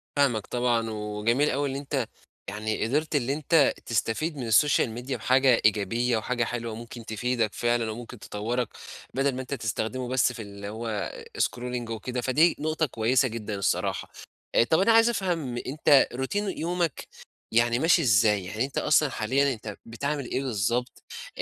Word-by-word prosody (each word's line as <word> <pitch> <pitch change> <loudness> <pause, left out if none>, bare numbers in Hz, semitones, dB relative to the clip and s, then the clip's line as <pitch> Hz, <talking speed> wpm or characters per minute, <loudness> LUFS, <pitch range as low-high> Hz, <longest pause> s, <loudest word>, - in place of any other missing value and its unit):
فاهمك 125 -7 +2
طبعًا 120 -2 0
وجميل 110 +6 0
أوي 140 +2 0
إن 135 - -4
أنت، 135 -3 -2 0.4
يعني 110 +1 -2
قدِرت 150 +4 0
اللي 135 -1 +1
أنت 155 0 +3
تستفيد 120 +7 -1
من 120 -4 -4
الSocial 145 +4 +4 0.2
media 135 - -3
بحاجة 130 -1 +3
إيجابية، 115 +3 +2
وحاجة 120 +2 -1
حلوة 115 -1 -4
ممكن 115 0 -9
تفيدك 115 0 -1
فعلًا 120 -1 0
وممكن 120 +1 -9
تطوّرك، 115 +5 -3 0.4
بدل 135 0 +1
ما 130 - -3
أنت 130 +2 -6
تستخدمه 115 +1 -2
بس 125 0 +2
في 115 - -7
اللي 100 -1 -8
هو 110 -1 -3 0.3
scrolling 125 -1 -2
وكده، 120 +3 -3
فدي 155 +7 +3
نقطة 155 +1 0
كويسة 125 +1 +2
جدًا 110 -3 -5
الصراحة، 100 -2 -1 0.4
آآ - - +6
طب 160 +7 +2
أنا 195 +4 +4
عايز 225 +1 +6
أفهم، 170 - -2
أنت 145 0 +4
Routine 130 +7 -3 0.2
يومك 170 -2 -2 0.4
يعني 120 +1 +3
ماشي 165 +3 +4
إزاي، 105 - +3
يعني 110 +7 -2
أنت 140 - -8
أصلًا 150 -1 +3
حاليًا 135 +5 +1
أنت 110 -3 -8
بتعمِل 140 +4 -3
إيه 130 +3 -2
بالضبط، 120 +1 -1 0.3
آآ - - -2
125 Hz, 165 wpm, -27 LUFS, 110-140 Hz, 0.4 s, آآ